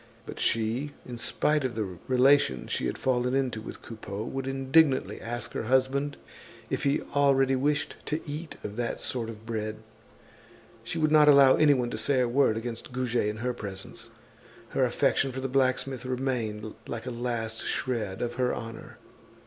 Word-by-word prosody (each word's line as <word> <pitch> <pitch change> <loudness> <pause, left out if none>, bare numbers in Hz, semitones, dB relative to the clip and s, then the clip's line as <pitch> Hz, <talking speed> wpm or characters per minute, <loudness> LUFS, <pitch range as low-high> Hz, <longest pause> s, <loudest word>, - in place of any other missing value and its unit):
But - - -8
she, 115 +6 0
in 120 -2 -7
spite 150 +4 +1
of 130 -3 -2
the 95 -6 -4
relations 130 - +3
she - - 0
had - - -3
fallen 125 0 +1
into 130 -5 0
with - - -9
Coupeau, 105 -2 -6
would 135 +3 -4
indignantly 135 +2 +2
ask 120 0 -4
her - - -3
husband 130 +3 +1 0.5
if - - -1
he 140 +1 +1
already 135 -2 +4
wished 145 +3 0
to 155 - 0
eat 150 +3 -5
of 105 +1 -6
that 120 -1 -2
sort 115 -3 0
of 110 -1 -10
bread. 110 -2 -3 1.1
She - - -4
would 155 -1 +2
not 150 -1 +6
allow 140 -2 +8
anyone 135 -6 +3
to - - -3
say 140 -2 +2
a 125 - +3
word 120 -2 +3
against 115 +2 -5
Goujet 125 -3 0
in 105 0 -2
her 125 - +1
presence; 95 -4 -8 0.6
her - - +2
affection 135 - +1
for 130 - -5
the 135 - -2
blacksmith 130 0 +1
remained 125 -5 -2
like 115 +1 -5
a 125 - -3
last 115 -2 -3
shred 110 -7 -2
of 120 0 -2
her 125 - +1
honor. 115 0 -8
125 Hz, 175 wpm, -28 LUFS, 115-135 Hz, 1.1 s, allow